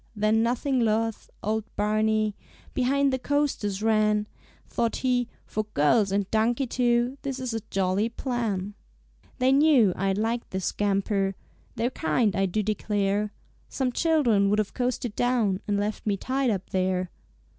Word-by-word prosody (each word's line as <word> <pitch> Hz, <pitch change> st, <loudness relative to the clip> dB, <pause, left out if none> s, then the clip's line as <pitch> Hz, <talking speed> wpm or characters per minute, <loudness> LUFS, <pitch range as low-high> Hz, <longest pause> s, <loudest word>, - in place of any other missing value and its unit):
Then 215 Hz, +1 st, +2 dB
nothing 250 Hz, +3 st, 0 dB
loth, 225 Hz, -1 st, 0 dB
old 220 Hz, +1 st, 0 dB
Barney 215 Hz, 0 st, +1 dB, 0.4 s
Behind 275 Hz, +2 st, +2 dB
the 260 Hz, -, 0 dB
coasters 250 Hz, -8 st, -1 dB
ran. 210 Hz, -1 st, +2 dB, 0.4 s
Thought 230 Hz, -1 st, -1 dB
he, 245 Hz, -2 st, +2 dB, 0.2 s
"For 215 Hz, 0 st, -3 dB
girls 195 Hz, +8 st, +3 dB
and 200 Hz, -1 st, 0 dB
donkey 230 Hz, +4 st, +2 dB
too. 245 Hz, +1 st, +1 dB
This 275 Hz, -2 st, -3 dB
is 255 Hz, -3 st, -3 dB
a 225 Hz, -, -1 dB
jolly 195 Hz, +3 st, +1 dB
plan." 225 Hz, -6 st, -2 dB, 0.6 s
"They 255 Hz, 0 st, +3 dB
knew 275 Hz, -, +5 dB
I'd 195 Hz, 0 st, 0 dB
like 230 Hz, +2 st, -1 dB
this 190 Hz, -1 st, -3 dB
scamper; 195 Hz, -1 st, 0 dB, 0.4 s
They're 240 Hz, +2 st, 0 dB
kind, 200 Hz, +5 st, +1 dB
I 195 Hz, -1 st, +2 dB
do 210 Hz, +4 st, -1 dB
declare. 205 Hz, 0 st, 0 dB, 0.4 s
Some 260 Hz, -2 st, -1 dB
children 245 Hz, -11 st, +2 dB
would 210 Hz, -, +2 dB
have 210 Hz, -2 st, -1 dB
coasted 245 Hz, -3 st, -2 dB
down 230 Hz, -6 st, +1 dB
And 205 Hz, -1 st, +1 dB
left 210 Hz, +1 st, -3 dB
me 200 Hz, -1 st, +1 dB
tied 260 Hz, +4 st, 0 dB
up 195 Hz, -4 st, -3 dB
there." 185 Hz, -1 st, 0 dB
215 Hz, 150 wpm, -26 LUFS, 200-245 Hz, 0.6 s, knew